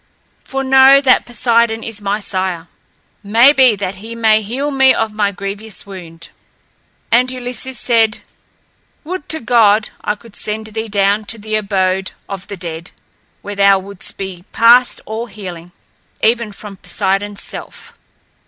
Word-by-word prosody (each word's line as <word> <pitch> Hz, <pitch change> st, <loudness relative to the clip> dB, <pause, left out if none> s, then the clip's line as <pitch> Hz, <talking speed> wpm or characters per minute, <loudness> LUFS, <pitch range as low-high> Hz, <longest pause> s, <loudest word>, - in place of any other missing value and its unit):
For 270 Hz, 0 st, -3 dB
know 265 Hz, +1 st, +7 dB
that 265 Hz, -2 st, +3 dB
Poseidon 235 Hz, -1 st, +1 dB
is 225 Hz, -2 st, -5 dB
my 205 Hz, +1 st, -1 dB
sire. 185 Hz, -4 st, -3 dB, 0.5 s
May 230 Hz, +7 st, +5 dB
be 260 Hz, -5 st, +5 dB
that 195 Hz, -1 st, -4 dB
he 225 Hz, +4 st, -9 dB
may 220 Hz, -1 st, +3 dB
heal 260 Hz, +8 st, -3 dB
me 265 Hz, -1 st, +5 dB
of 225 Hz, -1 st, -1 dB
my 205 Hz, -1 st, 0 dB
grievous 200 Hz, +2 st, -6 dB
wound." 170 Hz, -4 st, -10 dB, 0.8 s
And 250 Hz, +2 st, +4 dB
Ulysses 250 Hz, -1 st, -5 dB
said, 225 Hz, -2 st, +2 dB, 0.8 s
"Would 350 Hz, 0 st, -6 dB
to 315 Hz, -, +1 dB
God, 225 Hz, -3 st, +3 dB
I 210 Hz, -, -1 dB
could 215 Hz, 0 st, -17 dB
send 215 Hz, +1 st, -4 dB
thee 220 Hz, +1 st, -5 dB
down 200 Hz, 0 st, +1 dB
to 225 Hz, -, -3 dB
the 215 Hz, 0 st, -7 dB
abode 190 Hz, -3 st, 0 dB
of 195 Hz, -2 st, -7 dB
the 200 Hz, -, -7 dB
dead, 170 Hz, -1 st, -6 dB, 0.5 s
where 205 Hz, -, -6 dB
thou 200 Hz, 0 st, +5 dB
wouldst 195 Hz, 0 st, -7 dB
be 190 Hz, -3 st, -6 dB
past 240 Hz, +2 st, +4 dB
all 225 Hz, +2 st, -5 dB
healing, 180 Hz, -5 st, -9 dB, 0.5 s
even 230 Hz, -1 st, +2 dB
from 200 Hz, -1 st, -10 dB
Poseidon's 200 Hz, +1 st, -2 dB
self." -, -, -9 dB
215 Hz, 150 wpm, -16 LUFS, 195-235 Hz, 0.8 s, know